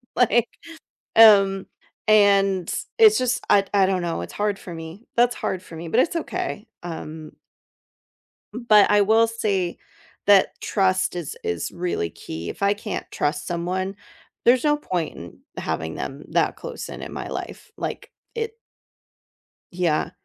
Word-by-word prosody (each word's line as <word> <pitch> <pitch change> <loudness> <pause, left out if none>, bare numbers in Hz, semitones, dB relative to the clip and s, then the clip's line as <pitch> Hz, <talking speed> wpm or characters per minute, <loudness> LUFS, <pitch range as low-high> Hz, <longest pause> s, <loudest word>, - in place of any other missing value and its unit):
Like 240 -1 +3 0.7
um, 195 -3 +7 0.4
and 195 -3 +4 0.3
it's 435 -1 +7
just 250 0 0
I 200 -1 +5
I 195 -2 +4
don't 185 -2 0
know, 165 - -2
it's 85 - -8
hard 205 -1 -1
for 175 - -9
me; 165 +7 -9
that's 245 +1 +4
hard 185 0 -3
for 165 - -12
me. 165 +1 -7
But 230 +9 +3
it's 340 +3 +1
okay. 335 - -4 0.2
Um 160 -2 -7 1.2
m 235 +1 -7
but 210 -2 +7
I 205 0 +5
will 225 +3 +4
say 200 -6 -1 0.5
that 200 -2 +4
trust 185 -3 +1
is 170 -5 -5
is 85 -1 -3
really 175 - -2
key. 80 +2 -7
If - - -8
I 200 +1 +4
can't 210 0 -6
trust 145 0 -2
someone, 185 +3 -2 0.5
there's 245 +3 +5
no 295 0 +3
point 175 - -3
in 85 0 -11 0.2
having 80 +1 -3
them 140 +2 -6
that - - +1
close - - -7
and - - -8
in - - -8
my - - -5
life. - - -7
Like, - - -5 0.2
it 455 -1 -3 1.2
Yeah, 170 -2 0
195 Hz, 155 wpm, -23 LUFS, 170-225 Hz, 1.2 s, um